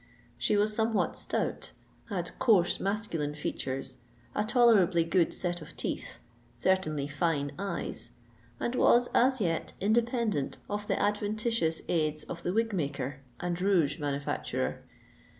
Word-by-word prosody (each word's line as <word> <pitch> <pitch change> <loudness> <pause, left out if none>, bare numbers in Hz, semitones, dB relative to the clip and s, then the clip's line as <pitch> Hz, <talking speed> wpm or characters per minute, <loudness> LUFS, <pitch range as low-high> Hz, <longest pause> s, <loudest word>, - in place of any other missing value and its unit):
She 205 +11 +2
was 210 +1 +2
somewhat 220 -5 +1
stout, - - -2 0.4
had 175 -3 -3
coarse 195 -8 +4
masculine 190 -8 -1
features, 135 -3 -3 0.4
a 210 - +1
tolerably 215 -8 +4
good 165 +1 +2
set 175 -1 -1
of 155 - -11
teeth, - - -3 0.4
certainly 155 -2 +1
fine 145 -1 0
eyes, 200 0 -3 0.5
and 240 - -1
was 245 -1 +5
as 260 +1 +4
yet 165 -5 -1
independent 225 - +1
of 205 0 -4
the - - 0
adventitious 210 -4 0
aids 155 -2 0
of 170 - -7
the 175 - -1
wig 225 +2 +1
maker 140 -5 -2 0.2
and 175 0 -2
rouge 170 -7 +2
manufacturer. 140 - -2
180 Hz, 130 wpm, -30 LUFS, 155-215 Hz, 0.5 s, was